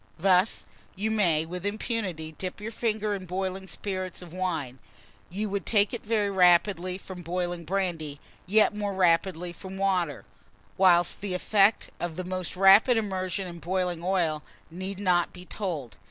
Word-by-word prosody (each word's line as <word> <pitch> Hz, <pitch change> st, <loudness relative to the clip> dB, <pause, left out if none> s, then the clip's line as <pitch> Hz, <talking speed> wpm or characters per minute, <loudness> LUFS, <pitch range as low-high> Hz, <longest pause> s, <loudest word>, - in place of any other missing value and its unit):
Thus, 185 Hz, +3 st, +2 dB, 0.3 s
you 210 Hz, +3 st, -1 dB
may, 170 Hz, -8 st, +2 dB
with 180 Hz, +2 st, -6 dB
impunity, 205 Hz, -6 st, -3 dB
dip 185 Hz, +3 st, -5 dB
your 215 Hz, +2 st, -5 dB
finger 215 Hz, -2 st, -1 dB
in 190 Hz, -2 st, -5 dB
boiling 190 Hz, +1 st, -3 dB
spirits 185 Hz, -2 st, -4 dB
of 170 Hz, -2 st, -12 dB
wine; 160 Hz, -9 st, -3 dB, 0.5 s
you 205 Hz, +4 st, -3 dB
would 200 Hz, -1 st, -2 dB
take 205 Hz, -1 st, +2 dB
it 240 Hz, -, -4 dB
very 210 Hz, -2 st, 0 dB
quickly 180 Hz, 0 st, +4 dB
from 185 Hz, -1 st, -9 dB
boiling 175 Hz, 0 st, -3 dB
brandy, 165 Hz, -6 st, -2 dB, 0.3 s
yet 210 Hz, +2 st, +4 dB
more 205 Hz, -1 st, -3 dB
rapidly 175 Hz, -1 st, +2 dB
from 190 Hz, +2 st, -9 dB
water; 185 Hz, -7 st, 0 dB, 0.5 s
whilst 175 Hz, -2 st, +4 dB
the 195 Hz, -2 st, -2 dB
effects 200 Hz, +3 st, +3 dB
of 175 Hz, -2 st, -3 dB
the 185 Hz, -, -4 dB
most 185 Hz, 0 st, -4 dB
rapid 195 Hz, +6 st, +7 dB
immersion 190 Hz, -2 st, -2 dB
in 170 Hz, -1 st, -8 dB
boiling 180 Hz, -1 st, -1 dB
oil 175 Hz, -5 st, +1 dB, 0.3 s
need 185 Hz, +3 st, -5 dB
not 180 Hz, -3 st, +2 dB
be 180 Hz, 0 st, -11 dB
told. 165 Hz, -, -5 dB
185 Hz, 155 wpm, -27 LUFS, 175-200 Hz, 0.5 s, rapid